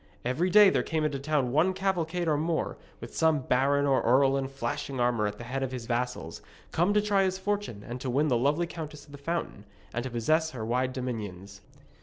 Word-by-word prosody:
Every 145 Hz, +9 st, +1 dB
day 205 Hz, 0 st, +7 dB
there -, -, +2 dB
came 160 Hz, -2 st, -1 dB
into 140 Hz, -2 st, -1 dB
the -, -, -12 dB
town 145 Hz, -4 st, +1 dB
one 160 Hz, +7 st, +3 dB
cavalcade 180 Hz, -3 st, -1 dB
or 155 Hz, -, +3 dB
more, 160 Hz, +2 st, -1 dB, 0.2 s
with -, -, -9 dB
some 160 Hz, -3 st, +3 dB
baron 135 Hz, +3 st, +2 dB
or 135 Hz, -2 st, +3 dB
earl 135 Hz, +3 st, +4 dB
in 135 Hz, -1 st, -1 dB
flashing 135 Hz, 0 st, -4 dB
armour 120 Hz, -3 st, +2 dB
at 105 Hz, 0 st, -5 dB
the -, -, -8 dB
head 130 Hz, +3 st, -3 dB
of 135 Hz, -1 st, -2 dB
his 125 Hz, -3 st, -5 dB
vassals, 120 Hz, -8 st, -3 dB, 0.3 s
come 175 Hz, +5 st, +2 dB
to 210 Hz, -, +5 dB
try 205 Hz, -2 st, +2 dB
his 190 Hz, -1 st, +1 dB
fortune 200 Hz, -, -3 dB
and 120 Hz, +1 st, -6 dB
to 130 Hz, -, -3 dB
win 140 Hz, +5 st, +2 dB
the 130 Hz, -, +2 dB
lovely 145 Hz, +8 st, +2 dB
Countess 155 Hz, -3 st, -8 dB
of 145 Hz, -, -18 dB
the 145 Hz, -, -10 dB
Fountain, 165 Hz, -8 st, -3 dB, 0.3 s
and 120 Hz, -, -1 dB
to 130 Hz, -, -4 dB
possess 155 Hz, +7 st, +1 dB
her 125 Hz, -7 st, -6 dB
wide 125 Hz, +3 st, 0 dB
dominions. 105 Hz, -6 st, -5 dB
140 Hz, 225 wpm, -28 LUFS, 125-160 Hz, 0.3 s, day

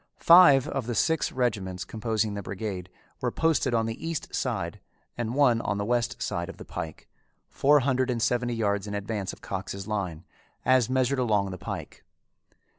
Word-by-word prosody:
Five 165 Hz, -7 st, +7 dB
of 135 Hz, -4 st, -3 dB
the 120 Hz, -, -2 dB
six 160 Hz, +9 st, +1 dB
regiments 100 Hz, -7 st, -2 dB
composing 110 Hz, -1 st, -1 dB
the 100 Hz, -, -4 dB
brigade 95 Hz, -2 st, -5 dB, 0.3 s
were -, -, +1 dB
posted 155 Hz, -6 st, +1 dB
on 115 Hz, -1 st, +2 dB
the 115 Hz, 0 st, -5 dB
east 165 Hz, -3 st, -4 dB
side -, -, -2 dB, 0.4 s
and 120 Hz, 0 st, -3 dB
one 125 Hz, -5 st, +4 dB
on 105 Hz, -, -2 dB
the 100 Hz, -, -2 dB
west 120 Hz, +1 st, 0 dB
side 85 Hz, +1 st, -3 dB
of -, -, -9 dB
the -, -, -10 dB
pike, 80 Hz, -3 st, -7 dB, 0.4 s
four 145 Hz, +1 st, +4 dB
hundred 130 Hz, -1 st, +1 dB
and 120 Hz, -2 st, 0 dB
seventy 120 Hz, +1 st, 0 dB
yards 100 Hz, -2 st, 0 dB
in 105 Hz, -, -4 dB
advance 100 Hz, -1 st, -3 dB
of -, -, -13 dB
Cox's 95 Hz, +1 st, -5 dB
line, 90 Hz, -6 st, -3 dB, 0.4 s
as 130 Hz, -3 st, +4 dB
measured 130 Hz, +1 st, +1 dB
along 105 Hz, -5 st, +1 dB
the 90 Hz, -, -7 dB
pike. -, -, -7 dB
115 Hz, 180 wpm, -27 LUFS, 100-130 Hz, 0.4 s, Five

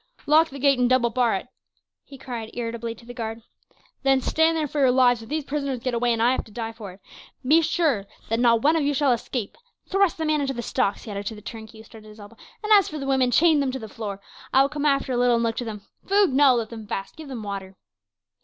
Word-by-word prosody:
"Lock 315 Hz, +2 st, +4 dB
the 275 Hz, -, -9 dB
gate 275 Hz, -1 st, +3 dB
and 245 Hz, -1 st, +3 dB
double 250 Hz, -2 st, +3 dB
bar 240 Hz, -2 st, +2 dB
it," 190 Hz, -, -5 dB, 0.6 s
he 275 Hz, -, -13 dB
cried 240 Hz, -4 st, -6 dB
irritably 230 Hz, -1 st, -4 dB
to 230 Hz, -, -17 dB
the 245 Hz, -, -9 dB
guard. 225 Hz, -2 st, -6 dB, 0.6 s
"Then 270 Hz, -1 st, +3 dB
stand 320 Hz, +5 st, +2 dB
there 310 Hz, -2 st, -1 dB
for 290 Hz, -, -4 dB
your 265 Hz, -2 st, +5 dB
lives; 250 Hz, -2 st, +4 dB
if 225 Hz, -, -12 dB
these 310 Hz, 0 st, -2 dB
prisoners 280 Hz, -2 st, -3 dB
get 255 Hz, -, -1 dB
away, 240 Hz, +1 st, +1 dB
and 230 Hz, -1 st, +1 dB
I 240 Hz, -, +4 dB
have 260 Hz, -, -1 dB
to 220 Hz, -, -16 dB
die 225 Hz, +1 st, -5 dB
for 220 Hz, -4 st, -9 dB
it, 190 Hz, -, -18 dB, 0.5 s
be 310 Hz, +5 st, +5 dB
sure 295 Hz, -, 0 dB, 0.2 s
that 225 Hz, +1 st, -1 dB
not 235 Hz, -2 st, +3 dB
one 310 Hz, +3 st, +4 dB
of 325 Hz, -, +1 dB
you 285 Hz, 0 st, 0 dB
shall 275 Hz, -1 st, +2 dB
escape. 235 Hz, -2 st, -3 dB, 0.3 s
Thrust 390 Hz, -3 st, +2 dB
the 320 Hz, -, -2 dB
man 305 Hz, -1 st, +1 dB
into 270 Hz, -1 st, -2 dB
the 240 Hz, -, -4 dB
stocks," 200 Hz, -2 st, -1 dB
he 215 Hz, -, -8 dB
added 200 Hz, 0 st, -5 dB
to 220 Hz, -, -4 dB
the 210 Hz, -, -12 dB
turnkey, 220 Hz, 0 st, -9 dB
who 220 Hz, -, -12 dB
stood 220 Hz, 0 st, -15 dB
at 215 Hz, -, -14 dB
his 210 Hz, +1 st, -15 dB
elbow; 205 Hz, +2 st, -13 dB, 0.3 s
"as 410 Hz, -2 st, +6 dB
for 305 Hz, -, -6 dB
the 275 Hz, -, -5 dB
women, 265 Hz, -2 st, +2 dB
chain 310 Hz, +4 st, +4 dB
them 275 Hz, -2 st, 0 dB
to 265 Hz, -, -4 dB
the 220 Hz, -4 st, -8 dB
floor. 205 Hz, -2 st, -6 dB, 0.3 s
I 270 Hz, -, +5 dB
will 275 Hz, -, 0 dB
come 295 Hz, 0 st, -1 dB
after 275 Hz, -2 st, +1 dB
a 250 Hz, -, 0 dB
little 245 Hz, 0 st, +3 dB
and 230 Hz, -, 0 dB
look 230 Hz, -1 st, -1 dB
to 245 Hz, -, -3 dB
them. 210 Hz, -3 st, -7 dB, 0.2 s
Food? 400 Hz, -6 st, +3 dB
No; 270 Hz, -1 st, +5 dB
let 230 Hz, -2 st, -2 dB
them 220 Hz, -2 st, -9 dB
fast. 195 Hz, -1 st, -5 dB
Give 315 Hz, -2 st, -10 dB
them 250 Hz, -5 st, -6 dB
water." 195 Hz, -2 st, -6 dB
245 Hz, 270 wpm, -24 LUFS, 225-280 Hz, 0.6 s, as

